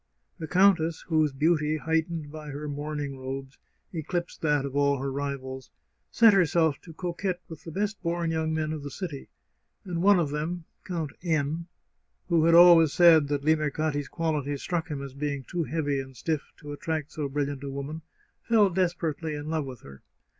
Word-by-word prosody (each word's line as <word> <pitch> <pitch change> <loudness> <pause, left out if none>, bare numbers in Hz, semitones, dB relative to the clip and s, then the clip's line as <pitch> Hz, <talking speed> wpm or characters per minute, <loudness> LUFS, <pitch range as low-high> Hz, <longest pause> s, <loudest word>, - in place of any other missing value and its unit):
The 160 - -5
countess, 180 -3 +3
whose 155 -2 +3
beauty, 155 +2 +1
heightened 160 -1 -1
by 155 -1 -8
her 145 +1 -5
mourning 145 -1 -4
robes, 135 +1 -6 0.3
eclipsed 170 +2 -4
that 150 -3 +2
of 140 0 -6
all 140 0 +3
her 135 +1 -3
rivals, 130 -2 -5 0.4
set 225 -2 +6
herself 165 -5 +3
to 165 - -12
coquette 180 +2 -3
with 160 -2 -10
the 165 - -6
best 205 +4 -2
born 170 -1 -1
young 160 0 -1
men 155 0 -1
of 155 - -5
the 145 - -6
city, 160 -3 -6 0.6
and 175 -3 -3
one 200 +1 +6
of 155 -4 0
them, 160 +3 -3 0.2
Count 165 -5 -3
N, 160 -1 -1 0.6
who 165 -2 +4
had 165 0 +5
always 170 -3 +8
said 165 -4 +6
that 145 -1 -2
Limercati's 155 -2 +1
qualities 150 -4 -2
struck 170 -3 -2
him 145 -4 -4
as 135 -2 -8
being 140 -1 -3
too 170 +4 -3
heavy 145 -4 -1
and 130 -1 -8
stiff 155 +6 -2
to 150 -1 -9
attract 155 -1 -3
so 145 -3 -3
bril 145 +1 0
liant 140 -1 -6
a 140 - -4
woman, 140 +4 -5 0.4
fell 215 -4 +4
desperately 170 -3 -1
in 150 +1 -5
love 155 -3 -1
with 130 -4 -9
her. 70 -1 -13
155 Hz, 180 wpm, -27 LUFS, 145-170 Hz, 0.6 s, always